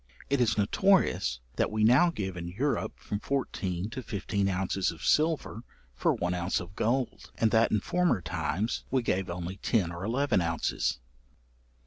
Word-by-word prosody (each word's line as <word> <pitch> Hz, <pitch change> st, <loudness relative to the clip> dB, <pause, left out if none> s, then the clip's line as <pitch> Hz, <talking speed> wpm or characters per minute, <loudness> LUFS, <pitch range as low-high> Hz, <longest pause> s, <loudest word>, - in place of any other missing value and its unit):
It 140 Hz, -2 st, +3 dB
is 110 Hz, -3 st, +2 dB
notorious, 100 Hz, -, +2 dB, 0.2 s
that -, -, +2 dB
we 110 Hz, 0 st, 0 dB
now 130 Hz, +10 st, +6 dB
give 95 Hz, -, -4 dB
in 85 Hz, -1 st, -5 dB
Europe 125 Hz, +12 st, -1 dB
from 105 Hz, -, -4 dB
fourteen 100 Hz, -9 st, -2 dB
to 130 Hz, -, -5 dB
fifteen 100 Hz, -3 st, -1 dB
ounces 95 Hz, 0 st, 0 dB
of 85 Hz, 0 st, -8 dB
silver 155 Hz, -7 st, +1 dB, 0.3 s
for -, -, +1 dB
one 90 Hz, +1 st, -1 dB
ounce 90 Hz, +1 st, 0 dB
of 90 Hz, +3 st, -9 dB
gold; 125 Hz, +2 st, -1 dB
and 110 Hz, -1 st, +2 dB
that 110 Hz, 0 st, +4 dB
in 105 Hz, -, +2 dB
former 180 Hz, -, +1 dB
times 105 Hz, +5 st, -2 dB
we 130 Hz, -2 st, +1 dB
gave 95 Hz, -3 st, 0 dB
only 90 Hz, +2 st, -5 dB
ten 95 Hz, -4 st, +1 dB
or 85 Hz, +2 st, -6 dB
eleven 125 Hz, 0 st, +1 dB
ounces. 85 Hz, -2 st, -1 dB
105 Hz, 165 wpm, -29 LUFS, 90-125 Hz, 0.3 s, now